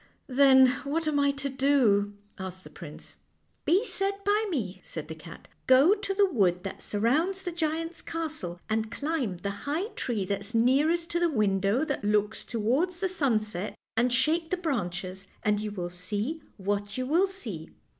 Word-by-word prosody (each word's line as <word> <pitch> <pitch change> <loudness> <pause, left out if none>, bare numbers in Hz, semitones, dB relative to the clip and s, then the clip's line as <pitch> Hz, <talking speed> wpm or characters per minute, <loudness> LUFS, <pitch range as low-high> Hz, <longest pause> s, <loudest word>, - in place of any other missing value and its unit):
" - - -44
Then, 265 0 +6 0.2
what 310 +3 -1
am 295 -2 +2
I 280 0 +4
to 280 0 -2
do? 260 -7 +2
" - - -37
asked 185 0 -7
the - - -12
prince. - - -11 0.2
" - - -43
Be 385 +7 +3
said 395 -3 0
by 420 +2 +2
me," 195 - -3
said 155 -2 -6
the - - -4
cat. 165 +1 -12
" - - -41
Go 310 +9 +6
to 405 -2 -2
the 405 0 +5
wood 190 - +1
that 195 - -6
surrounds 310 - +1
the 355 - -3
giant's 330 0 -2
castle, 310 - -4
and 220 0 -1
climb 280 - -2
the 200 +3 -3 0.2
high 345 +9 -1
tree 225 - -2
that's 200 +4 -3
nearest 295 +9 +3
to 345 - +1
the 345 -1 +3
window 205 +1 +2
that 280 -7 -3
looks 210 +1 +1
towards 265 +11 0
the 375 0 0
sunset, 215 - -1 0.2
and 240 +2 +2
shake 320 +6 +2
the 370 - 0
branches, 190 - -3 0.2
and 210 -1 +2
you 215 0 -3
will 180 -4 -5
see 210 - -3 0.2
what 205 +1 -2
you 255 - -1
will 340 +8 +3
see. 220 - -6
255 Hz, 185 wpm, -28 LUFS, 205-325 Hz, 0.2 s, Then